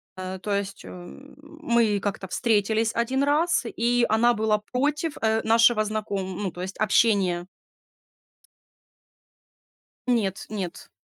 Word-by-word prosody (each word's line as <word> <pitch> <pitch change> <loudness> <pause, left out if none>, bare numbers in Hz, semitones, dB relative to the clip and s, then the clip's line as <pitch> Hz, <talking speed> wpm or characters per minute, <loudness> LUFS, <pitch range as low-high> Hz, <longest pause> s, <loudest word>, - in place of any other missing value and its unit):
А, 185 0 -5
э, - - -9
то 205 +2 -3
есть 200 0 -3
м 180 +11 -12
мы 235 -9 0
как-то 200 -1 -4
встретились 220 +1 +1
1 255 +4 0
раз, 300 +2 +2
и 240 +1 +1
она 235 +2 +4
была 215 -1 +1
против, 295 +4 -1
э, 220 0 +2
нашего 225 0 +4
знаком 205 -3 -3
ну, 190 - -2
то 175 - -9
есть 190 +1 -6
общения. 195 -4 +2 2.6
Нет, 215 -6 0
нет. 190 -5 -6
220 Hz, 125 wpm, -25 LUFS, 195-240 Hz, 2.6 s, она